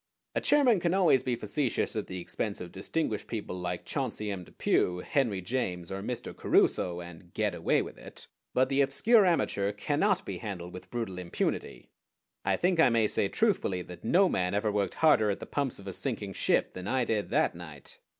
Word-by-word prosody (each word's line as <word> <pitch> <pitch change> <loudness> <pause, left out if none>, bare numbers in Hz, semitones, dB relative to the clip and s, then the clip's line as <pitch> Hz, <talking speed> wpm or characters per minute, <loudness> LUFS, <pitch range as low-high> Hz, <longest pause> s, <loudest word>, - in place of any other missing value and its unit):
A - - 0
chairman 265 -8 +4
can 175 +1 +1
always 175 -9 +4
be 125 -2 -1
facetious 120 +4 -1
at 110 - -2
the 95 - -5
expense 100 +4 -4
of 90 -1 -7
distinguished 105 +2 -2
people 105 -5 -4
like 90 -1 -4
Chauncey 115 -6 -2
M. 95 -2 -5
Depew, 90 +1 0
Henry 120 -10 +1
James, 90 -5 -3
or 95 0 -4
Mr. 120 +3 -5
Caruso, 90 -1 +2
and 85 0 -12
"get - - +1
away - - +1
with - - -10
it"; - - -9 0.3
but 130 +1 +3
the 140 0 +3
obscure 195 - +4
amateur 100 - +1
cannot 150 - 0
be - - -5
handled 90 -6 -6
with 90 - -10
brutal 115 -7 -4
impunity. 85 -7 -3 0.5
I - - +1
think 180 -1 +1
I 160 - +7
may 115 -2 +3
say 100 - 0
truthfully 100 - +1
that 90 -1 -11
no 185 - +4
man 90 - 0
ever 105 +1 +1
worked 100 -1 -1
harder 125 -10 +4
at 100 - -1
the - - -7
pumps 140 -3 -2
of 100 - -12
a 95 - -5
sinking - - -3
ship - - +1
than 90 +1 -7
I 130 +1 +1
did 110 -2 -1
that - - +2
night. 80 -5 -11
105 Hz, 200 wpm, -29 LUFS, 90-140 Hz, 0.5 s, I